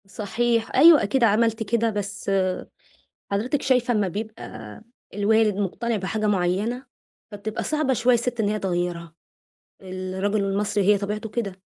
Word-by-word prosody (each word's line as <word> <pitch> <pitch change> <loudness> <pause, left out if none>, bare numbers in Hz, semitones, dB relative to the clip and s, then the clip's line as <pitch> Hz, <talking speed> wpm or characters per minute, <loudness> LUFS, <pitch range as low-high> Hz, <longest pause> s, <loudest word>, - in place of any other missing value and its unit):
صحيح، 225 +3 -1
أيوه، 315 +3 +8
أكيد 240 +5 +1
عملت 225 +1 +2
كده. 230 +2 +1
بس 200 -1 -4 1.0
حضرتِك 245 +8 0
شايفة، 250 -2 +2
أما 210 -3 +1
بيبقى 210 - -7 0.3
الوالد 210 0 +2
مقتنع 215 +4 -2
بحاجة 210 +2 -2
معيَّنة، 205 +6 0 0.5
فبتبقى 210 +2 -5
صعبة 305 -3 0
شوية 245 +1 +3
الست 240 0 -1
إن 205 -2 +1
هي 215 0 -1
تغيِّرها. 175 -3 -3 0.7
الرجل 190 +2 -2
المصري 200 +1 0
هي 205 +1 +4
طبيعته 210 +2 -4
كده، 200 -4 -4
210 Hz, 135 wpm, -24 LUFS, 195-235 Hz, 1.0 s, أيوه